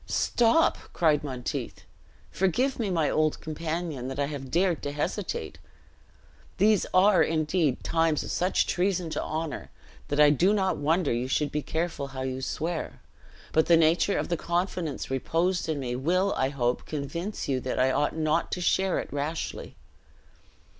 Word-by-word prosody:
"Stop!" 240 Hz, +8 st, +3 dB
cried 155 Hz, -3 st, +2 dB
Monteith. 130 Hz, -4 st, -5 dB, 0.5 s
"Forgive 245 Hz, +9 st, 0 dB
me, 220 Hz, -4 st, 0 dB
my 165 Hz, -5 st, +1 dB
old 155 Hz, -1 st, +1 dB
companion, 160 Hz, -3 st, -4 dB
that 135 Hz, -, -5 dB
I 140 Hz, -, +1 dB
have 140 Hz, -2 st, -6 dB
dared 175 Hz, +1 st, +1 dB
to 145 Hz, -, -3 dB
hesitate. 145 Hz, 0 st, -3 dB, 1.0 s
These 210 Hz, 0 st, +3 dB
are, 190 Hz, +1 st, +5 dB
indeed, 155 Hz, -3 st, +1 dB
times 165 Hz, -2 st, +1 dB
of -, -, -5 dB
such 180 Hz, +2 st, +1 dB
treason 180 Hz, -2 st, 0 dB
to -, -, -2 dB
honor, 160 Hz, 0 st, -4 dB, 0.4 s
that 145 Hz, -, -2 dB
I 150 Hz, -1 st, +7 dB
do 180 Hz, +8 st, +3 dB
not 190 Hz, -3 st, +1 dB
wonder 155 Hz, 0 st, +1 dB
you 120 Hz, +2 st, -1 dB
should 145 Hz, +2 st, 0 dB
be 150 Hz, -, -1 dB
careful 160 Hz, -1 st, -3 dB
how 130 Hz, -1 st, -6 dB
you 130 Hz, 0 st, -3 dB
swear; 160 Hz, +5 st, -3 dB, 0.5 s
but 160 Hz, -, +3 dB
the 170 Hz, -, +6 dB
nature 165 Hz, +5 st, +3 dB
of -, -, -2 dB
the 170 Hz, -, 0 dB
confidence 170 Hz, -5 st, -2 dB
reposed 165 Hz, +6 st, 0 dB
in 155 Hz, -2 st, -1 dB
me 125 Hz, -2 st, -3 dB
will. 180 Hz, +9 st, +1 dB
I 130 Hz, -, +1 dB
hope, 125 Hz, -3 st, -1 dB
convince 160 Hz, +7 st, -4 dB
you 130 Hz, -2 st, 0 dB
that 130 Hz, -, -3 dB
I 130 Hz, +1 st, +3 dB
ought 145 Hz, +3 st, 0 dB
not 160 Hz, +1 st, 0 dB
to -, -, -2 dB
share 190 Hz, +1 st, +1 dB
it -, -, -5 dB
rashly. 145 Hz, +3 st, -4 dB
160 Hz, 165 wpm, -27 LUFS, 145-180 Hz, 1.0 s, I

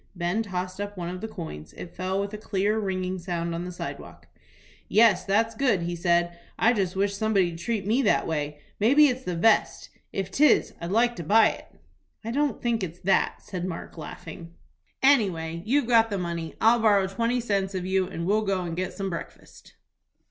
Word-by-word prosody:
Ben 175 Hz, +4 st, -1 dB
tossed 185 Hz, -2 st, -4 dB
up 205 Hz, 0 st, -5 dB
one 175 Hz, -1 st, -4 dB
of 180 Hz, +1 st, -6 dB
the 220 Hz, -, -4 dB
coins. 160 Hz, -, -8 dB
It 170 Hz, -, -10 dB
fell 190 Hz, +1 st, -2 dB
with 200 Hz, +1 st, -3 dB
a -, -, -4 dB
clear, 210 Hz, +1 st, 0 dB
ringing 185 Hz, -2 st, -2 dB
sound 170 Hz, -1 st, -3 dB
on 170 Hz, +1 st, -4 dB
the 180 Hz, -, -5 dB
sidewalk. 175 Hz, -, -8 dB, 0.6 s
"Yes, 215 Hz, -4 st, +4 dB
that's 225 Hz, +3 st, +1 dB
good," 225 Hz, -7 st, +1 dB
he 175 Hz, +1 st, -3 dB
said. 175 Hz, 0 st, +1 dB, 0.2 s
"I 230 Hz, +2 st, +4 dB
just 190 Hz, -5 st, -1 dB
wish 200 Hz, +1 st, 0 dB
somebody'd 195 Hz, -5 st, +1 dB
treat 210 Hz, +2 st, -2 dB
me 230 Hz, +6 st, +2 dB
that -, -, +2 dB
way. 150 Hz, -2 st, -3 dB, 0.2 s
Maybe 280 Hz, +8 st, +6 dB
it's 250 Hz, 0 st, -3 dB
the 180 Hz, -, -3 dB
vest? 215 Hz, +6 st, +2 dB, 0.2 s
If 195 Hz, -1 st, -3 dB
'tis 295 Hz, +9 st, +4 dB
I'd 170 Hz, -, -4 dB
like 235 Hz, +4 st, +2 dB
to 170 Hz, -, -5 dB
buy 215 Hz, +7 st, +5 dB
it." -, -, -9 dB, 0.6 s
"I 230 Hz, -, -3 dB
don't 290 Hz, +3 st, -1 dB
think 235 Hz, -3 st, 0 dB
it's 175 Hz, 0 st, -6 dB
that," 195 Hz, -, +1 dB
said 180 Hz, -3 st, -5 dB
Mark, 175 Hz, -3 st, -6 dB
laughing. 165 Hz, +1 st, -9 dB, 0.5 s
"Anyway 175 Hz, -12 st, +2 dB
you've 280 Hz, +3 st, +2 dB
got 230 Hz, -2 st, +4 dB
the 200 Hz, -, -2 dB
money. 170 Hz, -2 st, -4 dB
I'll 230 Hz, +2 st, +5 dB
borrow 205 Hz, -3 st, +4 dB
twenty 230 Hz, +6 st, -1 dB
cents 200 Hz, -4 st, -1 dB
of 180 Hz, -1 st, -3 dB
you, 190 Hz, 0 st, +1 dB
and 170 Hz, -2 st, -5 dB
we'll 210 Hz, +4 st, +2 dB
go 195 Hz, -3 st, -1 dB
and 170 Hz, -1 st, -4 dB
get 185 Hz, +1 st, -3 dB
some 195 Hz, -2 st, -4 dB
breakfast." 170 Hz, -, -9 dB
190 Hz, 200 wpm, -26 LUFS, 175-220 Hz, 0.6 s, Maybe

